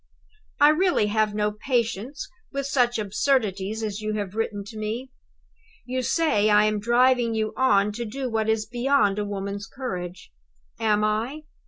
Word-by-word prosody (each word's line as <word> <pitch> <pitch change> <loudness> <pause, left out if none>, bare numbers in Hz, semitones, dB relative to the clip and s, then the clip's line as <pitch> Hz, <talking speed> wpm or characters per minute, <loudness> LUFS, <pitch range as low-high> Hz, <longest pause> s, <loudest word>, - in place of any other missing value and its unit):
I 290 0 +7
really 345 - +3
have 215 -1 +1
no 210 0 +1
patience 235 +3 -2 0.2
with 275 -1 -3
such 245 -3 +2
absurdities 215 -1 0
as 210 -1 -3
you 215 0 -2
have 200 -3 -3
written 215 -2 -2
to 215 +2 -10
me. 230 +5 -4 0.7
You 255 +1 -2
say 235 -7 +2
I 210 0 +5
am 215 0 +1
driving 240 +1 +3
you 215 -1 -1
on 210 -6 +3
to 235 +3 -5
do 260 +4 -4
what 220 -2 -1
is 220 -1 +1
beyond 240 -3 +1
a 205 - -1
woman's 200 0 -4
courage. 180 - -6 0.5
Am 210 -1 +2
I? 225 +8 -1
220 Hz, 160 wpm, -25 LUFS, 210-255 Hz, 0.7 s, I